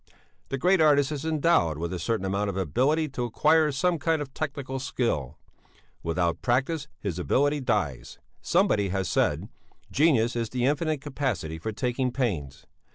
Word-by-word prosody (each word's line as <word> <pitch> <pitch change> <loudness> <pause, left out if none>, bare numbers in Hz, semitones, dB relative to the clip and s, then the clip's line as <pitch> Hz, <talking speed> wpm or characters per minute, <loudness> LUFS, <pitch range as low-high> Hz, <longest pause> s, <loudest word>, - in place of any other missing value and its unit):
The 135 - -2
great 180 +5 +3
artist 145 -2 +4
is 150 0 -4
endowed 155 - +2
with 85 +3 -3
a 90 - -3
certain 100 +3 -1
amount 100 +2 -1
of 95 - -4
ability 130 - +1
to 130 -2 -4
acquire 150 +6 +3
some 170 +5 +1
kind 165 +1 +1
of 140 -2 -6
technical 140 -3 -4
skill. 115 - -2 0.6
Without 85 0 -1
practice 135 +5 0
his 90 -4 -3
ability 145 +10 +2
dies. 95 - -2 0.2
Somebody 170 - +2
has 95 -1 -1
said: - - +1 0.4
genius 130 -6 +3
is 115 -2 -1
the 125 +2 -1
infinite 150 +1 0
capacity 130 - -3
for 110 +7 -3
taking 125 +4 -1
pains. 85 - -3
130 Hz, 160 wpm, -27 LUFS, 95-150 Hz, 0.6 s, artist